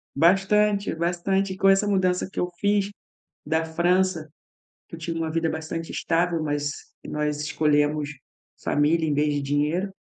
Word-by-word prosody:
Bastante, 200 +5 +3
bastante. 185 +3 0
Com 195 +1 +3
essa 195 +2 +4
mudança 185 -2 +1
que - - -5
eu 180 - 0
fiz 205 -1 +2 0.6
da 160 +1 +1
França, 175 0 +1 0.6
que - - -8
eu - - -12
tinha 165 0 -4
uma 165 -1 -2
vida 165 0 0
bastante 160 +1 -4
estável, 170 0 0
mas 145 -1 -1 0.3
nós 150 0 -2
escolhemos 150 0 +1 0.5
família 160 +2 +2
em 150 - +1
vez 150 +1 +1
de 145 - 0
dinheiro, 150 +7 0
165 Hz, 150 wpm, -25 LUFS, 150-190 Hz, 0.6 s, essa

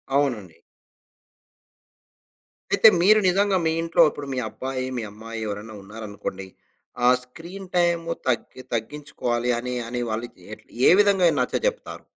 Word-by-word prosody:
అవునండి. 110 - -1 2.2
అయితే 200 +3 +7
మీరు 215 +4 +6
నిజంగా 195 +1 +2
మీ 160 - +2
ఇంట్లో 165 0 +2
ఇప్పుడు 145 -1 -8
మీ 130 - -2
అబ్బాయి, 130 +3 -4
మీ 115 - -3
అమ్మాయి 115 +1 -8
ఎవరైనా 105 +2 -6
ఉన్నారనుకోండి? 105 -2 -7 0.6
ఆ - - +7
స్క్రీన్ 170 +9 -10
టైం 175 -1 +3 0.3
తగ్గి 130 +1 -2
తగ్గించుకోవాలి 120 -1 -3
అనె 125 +1 -4
అనే 120 +1 -3
వాళ్ళకి 115 -3 -5
ఏట్ల 110 - -11 0.2
ఎ - - +7
విధంగా 200 -4 +4
నచ్చ - - -1
చెప్తారు? - - -5
130 Hz, 130 wpm, -24 LUFS, 110-170 Hz, 2.2 s, అయితే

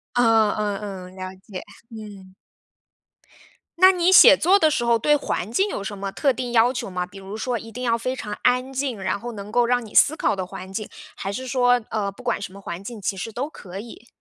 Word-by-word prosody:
啊， 225 -3 +4
嗯 210 -2 -1 0.3
嗯， 185 - -15
了 185 0 -7
解。 190 -1 -9 0.3
嗯。 205 -4 -11 1.4
那 370 +2 +8
你 360 -1 +2
写 370 - +9
作 375 +5 +4
的 315 - +4
时 295 -5 0
候 235 -1 +3
对 295 +6 +3
环 225 -8 -3
境 390 - +1
有 205 - -4
什 200 +1 -6
么 195 0 -4
特 275 +6 +1
定 245 0 -4
要 235 +1 +4
求 245 - -4
吗？ 180 -1 -3
比 180 +2 -14
如 195 +1 -8
说 245 +2 -2
一 225 0 -10
定 250 +3 -7
要 230 -2 +2
非 255 +3 -3
常 210 -5 -6
安 250 +1 +2
静， 260 -6 -3
然 195 - -1
后 240 +3 -6
能 205 -1 -8
够 240 +1 +3
让 245 0 +1
你 215 - -13
思 310 - +6
考 - - 0
的 190 -1 -3
环 185 +1 -9
境， 210 +2 -4 0.3
还 195 - -4
是 260 +5 -5
说， 245 -1 +3
呃， 205 -2 -2
不 200 - -15
管 245 -4 -1
什 200 - -6
么 200 - -11
环 175 0 -7
境， 220 0 -8
其 195 - -2
实 225 +4 -5
都 260 +7 -4
可 190 - -10
以。 235 +2 -11
225 Hz, 255 characters per minute, -23 LUFS, 200-250 Hz, 1.4 s, 写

